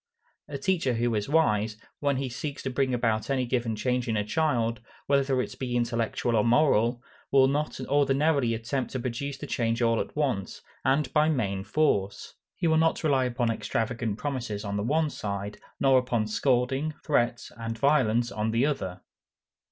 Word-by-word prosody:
A 145 - -5
teacher 150 -5 0
who 120 +1 0
is 105 +3 -1
wise, 110 -9 +2 0.2
when 140 -2 +1
he 135 0 -2
seeks 140 +3 -5
to 130 - -2
bring 130 0 0
about 115 -2 0
any 130 -2 +1
given 120 -2 -1
change 125 +2 -1
in 110 -2 0
a 105 - +1
child, 115 -2 0 0.2
whether 140 -2 +2
it - - -9
be 125 -2 -2
intellectual 120 0 0
or 105 - +3
moral, 120 -2 +3 0.3
will 135 -1 +6
not 145 +3 -1
ordinarily 140 -2 +2
attempt 120 +4 -3
to 130 - -2
produce 130 +3 -4
the - - -7
change 115 -1 -1
all 115 -1 +2
at - - -4
once, 130 -10 -2 0.2
and 135 0 +1
by 155 0 +4
main 100 -10 -1
force. 100 -5 0 0.2
He - - -3
will 160 -1 +4
not 160 +1 +2
rely 135 -4 +3
upon 120 -1 0
extravagant 115 -1 -2
promises 120 -7 -4
on 100 0 -3
the 100 - -1
one 150 +7 +1
side, 100 0 -5 0.2
nor 135 -1 +5
upon 120 -3 -1
scolding, 130 +6 0
threats, 120 -5 0
and 115 -1 -5
violence 120 -4 +2
on 105 +2 -1
the 115 +4 +2
other. 95 -12 -3
125 Hz, 175 wpm, -27 LUFS, 115-140 Hz, 0.3 s, will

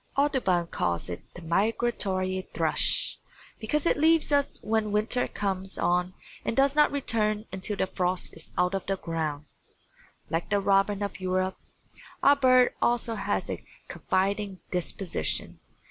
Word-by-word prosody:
Audubon 260 -12 +2
calls 85 - -2
it 85 - -5
the 175 - -9
Migratory 190 0 0
Thrush, - - +1 0.4
because 285 +8 -1
it - - +3
leaves 320 +1 +4
us 285 -1 +2
when 220 -1 0
winter 215 +4 +2
comes 190 -1 -3
on 180 +1 +1 0.3
and 230 - -2
does 275 0 +4
not 300 0 +5
return 215 -6 0
until 195 +2 -3
the - - +1
frost 185 -1 -2
is 160 - -7
out 180 +2 +2
of 195 - -1
the 195 0 0
ground. 155 -4 -3 0.8
Like 165 +1 -2
the 205 - +2
robin 195 +1 +2
of 200 -2 -4
Europe, 185 0 -1 0.6
our 285 - +7
bird 255 -2 +5
also 240 -1 +1
has 220 - -1
a - - -5 0.3
confiding 195 0 -1
disposition. 180 +1 -2
195 Hz, 145 wpm, -27 LUFS, 185-235 Hz, 0.8 s, our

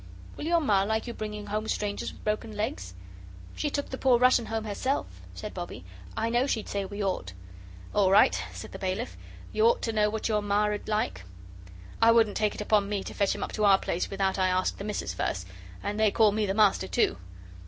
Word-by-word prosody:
"Will - - -6
your 340 0 +3
Ma 205 -10 +3
like 220 +3 0
you 240 - -5
bringing 210 -1 -5
home 215 +1 -3
strangers 205 -2 -2
with - - -16
broken 215 +1 -2
legs?" 95 - -3 0.6
"She 295 - -1
took 285 0 -3
the 260 - -5
poor 255 -2 +5
Russian 250 -1 +4
home 225 0 -2
herself," 240 +6 -1 0.3
said 210 - -6
Bobbie. 175 - -7 0.3
"I 225 +1 0
know 245 +3 +2
she'd 225 -6 -1
say 200 -1 -2
we 205 +1 -5
ought." 180 - -2 0.6
"All 200 -2 +4
right," 145 - +5
said 90 0 -9
the - - -8
bailiff, 190 +6 -3 0.4
"you 435 - +2
ought 480 +1 +2
to 225 - -1
know 210 -1 +3
what 220 0 -2
your 215 -2 +1
Ma 205 0 +1
'ud 205 - -6
like. 210 - -1 0.8
I 230 - +7
wouldn't 225 -3 +4
take 210 -1 +1
it - - -5
upon 205 -1 +2
me 200 -2 -1
to - - -7
fetch 200 -1 +1
him - - -4
up - - -4
to 215 - 0
our 195 -1 +7
place 175 -2 -2
without 195 -1 0
I 185 - +3
asked 185 0 0
the - - -4
Missus 210 -1 -3
first, 90 -1 -2 0.4
and 210 +1 -3
they 220 -1 +5
call 215 0 +4
me 210 0 0
the 195 - -1
Master, 205 - +3
too." 95 - +1
210 Hz, 225 wpm, -28 LUFS, 195-220 Hz, 0.8 s, I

